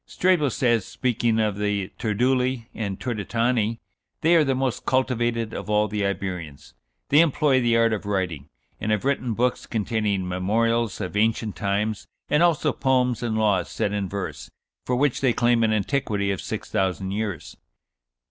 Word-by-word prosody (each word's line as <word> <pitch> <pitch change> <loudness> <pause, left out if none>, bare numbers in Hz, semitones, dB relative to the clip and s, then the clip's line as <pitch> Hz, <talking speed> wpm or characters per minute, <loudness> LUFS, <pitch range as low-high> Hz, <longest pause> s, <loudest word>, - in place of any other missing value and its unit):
Strabo 175 -6 +2
says, 120 -4 +1
speaking 120 -1 0
of 105 -2 0
the 105 -2 -1
Turduli 125 +2 0
and 100 -4 -4
Turdetani, 115 0 0 0.4
"they 165 +2 +4
are 165 - +6
the 135 -2 +1
most 130 -2 -1
cultivated 120 -3 0
of - - -6
all 105 0 +3
the 105 0 -2
Iberians; 90 -9 -4 0.4
they 145 - +5
employ 150 -4 +3
the 120 -1 +3
art 115 -1 +3
of 105 -1 -4
writing, 90 -8 -2 0.3
and 110 - -2
have 105 +3 0
written 130 -4 0
books 125 +2 0
containing 105 -4 -1
memorials 110 +5 0
of 90 +1 -5
ancient 110 0 +1
times, 100 +2 -2 0.2
and 150 - +4
also 170 -4 +3
poems 125 -3 +1
and 115 -2 -1
laws 105 -4 +1
set 100 - -2
in 100 -2 -2
verse, 100 0 -5 0.4
for 125 - +1
which 140 0 +1
they 130 -3 +3
claim 120 -1 +3
an 110 - +2
antiquity 105 -2 0
of 95 - -3
six - - -6
thousand 95 0 -1
years." 105 -2 -4
110 Hz, 165 wpm, -24 LUFS, 100-125 Hz, 0.4 s, are